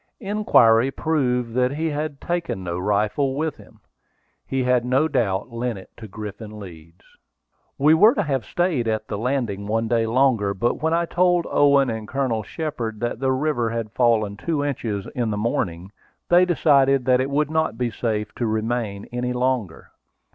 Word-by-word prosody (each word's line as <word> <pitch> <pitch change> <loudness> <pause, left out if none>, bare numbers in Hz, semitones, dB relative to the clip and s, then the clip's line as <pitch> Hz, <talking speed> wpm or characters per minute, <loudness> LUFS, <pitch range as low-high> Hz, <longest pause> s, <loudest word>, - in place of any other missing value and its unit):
Inquiry 135 - +4
proved 125 -6 -1
that 125 +2 +1
he 160 +2 -2
had 145 -1 -4
taken 170 - -3
no 85 0 -3
rifle 105 +8 0
with 155 +1 -2
him. - - -18 0.7
He 135 -1 -1
had 125 -1 +2
no 130 +5 +2
doubt 115 -7 -1
lent 115 -1 -3
it 95 - -13
to 110 - -9
Griffin 105 +1 -8
Leeds. 85 -3 -13 0.7
We 150 +3 +5
were 210 +9 +6
to - - +1
have 135 -5 -1
stayed 170 -10 -1
at 110 -1 -2
this 100 - -3
landing 115 -5 -2
one 115 +1 0
day 115 -1 +1
longer, 115 -5 +2
but 120 +5 -1
when 160 +1 +1
I 170 +1 +2
told 175 0 +2
Owen 140 -3 +4
and 110 -1 -5
Colonel 125 -3 -1
Shepard 115 -3 -5
that 120 -1 -2
the 135 0 +1
river 130 -3 0
had 115 -2 -4
fallen 110 -4 +1
two 150 +3 -2
inches 110 -8 -3
in 120 -3 -1
the 105 - -2
morning, 95 -4 -2 0.4
they 175 +1 +6
decided 140 -6 +3
that 130 -1 +3
it 135 - -2
would 150 +1 0
not 160 -6 0
be 120 -1 -1
safe 105 -1 -3
to 120 - -1
remain 110 -2 -2
any 125 0 -2
longer. 125 -8 -2
125 Hz, 175 wpm, -22 LUFS, 110-145 Hz, 0.7 s, were